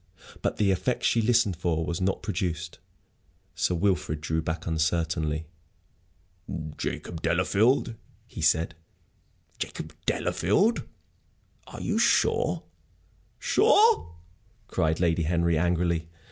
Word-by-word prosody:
But - - -1
the 100 -2 +3
effect 115 +7 -1
she 115 - +3
listened 115 -4 +3
for 80 -2 -1
was 85 +2 -3
not 95 +1 0
produced. 85 -4 -3 0.7
Sir 90 - 0
Wilfrid 85 -4 0
drew 80 +1 -1
back 80 +1 -4
uncertainly. 80 -1 0 1.3
"Jacob 85 -2 -5
Delafield?" 115 +3 +2 0.3
he - - -8
said. 80 +1 +2 0.9
"Jacob - - -5
Delafield? 200 - +1 0.8
Are - - -9
you - - 0
sure?" - - +2 0.7
"Sure?" 435 - +4 0.5
cried 80 0 0
Lady 85 -1 +2
Henry, 85 +1 +1
angrily. 85 0 +1
85 Hz, 105 wpm, -27 LUFS, 80-100 Hz, 1.3 s, Sure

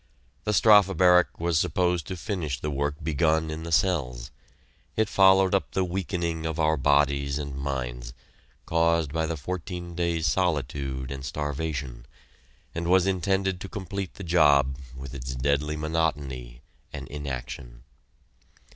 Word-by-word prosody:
The 105 - +1
Strafe 100 -3 +6
Barrack 90 -1 +4
was 85 -1 +1
supposed 90 0 0
to 95 - -5
finish 80 - -3
the 75 - -3
work 70 +1 -1
begun 80 +1 +1
in 80 +1 -5
the 85 0 -6
cells. 75 - 0 0.7
It 110 -1 +2
followed 95 -1 +5
up 100 - 0
the 95 - +1
weakening 85 -3 -2
of 80 0 -4
our 80 0 +3
bodies 70 0 +2
and 70 -2 -5
minds, 60 -3 -4 0.5
caused 85 -2 +1
by 80 0 0
the 80 0 -3
fourteen 85 +3 -5
days' 85 -2 -1
solitude 70 -5 -1
and 70 -1 -6
starvation, 70 -4 -4 0.7
and 85 0 -3
was 95 0 +5
intended 95 0 0
to 95 - -6
complete 100 -1 -5
the 95 - -8
job 75 -6 +4 0.2
with 65 0 -8
its 65 -1 -5
deadly 70 +3 0
monotony 70 -6 -2 0.3
and 70 -2 -7
inaction. 65 -4 -6
80 Hz, 140 wpm, -26 LUFS, 70-90 Hz, 0.7 s, Strafe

